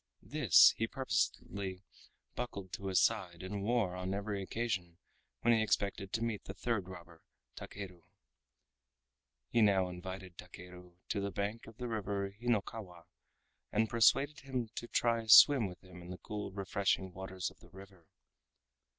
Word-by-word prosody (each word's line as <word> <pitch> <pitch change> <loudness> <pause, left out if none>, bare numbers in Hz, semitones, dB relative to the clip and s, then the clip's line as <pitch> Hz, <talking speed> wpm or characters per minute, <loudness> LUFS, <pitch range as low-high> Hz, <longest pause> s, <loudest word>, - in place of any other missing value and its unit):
This - - +6
he 110 - 0
purposedly 100 -6 -2 0.5
buckled 100 -6 -6
to 100 - -5
his 95 -1 +3
side 95 -6 0
and 100 +2 -4
wore 105 -4 +1
on 90 +1 -3
every 100 0 -3
occasion 95 -5 -3 0.4
when 120 - +4
he 110 - +3
expected 100 -2 -1
to 115 - -1
meet 115 -3 -3
the 95 - -7
third 110 -3 -2
robber 85 -2 -12 0.3
Takeru. 95 -4 -8 1.5
He 115 - +3
now 95 -3 +4
invited 90 0 -8
Takeru 90 0 -12
to 100 - -1
the 100 - -2
bank 100 +3 -4
of 110 -1 -13
the 125 -1 -4
River 100 -3 -2
Hinokawa, 105 -5 -3 0.7
and 110 +2 +1
persuaded 135 +5 +4
him 130 -4 -4
to 120 - -6
try 115 -1 +1
a 110 - -11
swim 130 0 +9
with 90 -2 -11
him 90 -1 -12
in 85 - -11
the 90 - -6
cool 105 -1 -6
refreshing 95 -1 -1
waters 95 -1 -5
of - - -22
the - - -17
river. 95 -3 -15
100 Hz, 155 wpm, -34 LUFS, 90-110 Hz, 1.5 s, swim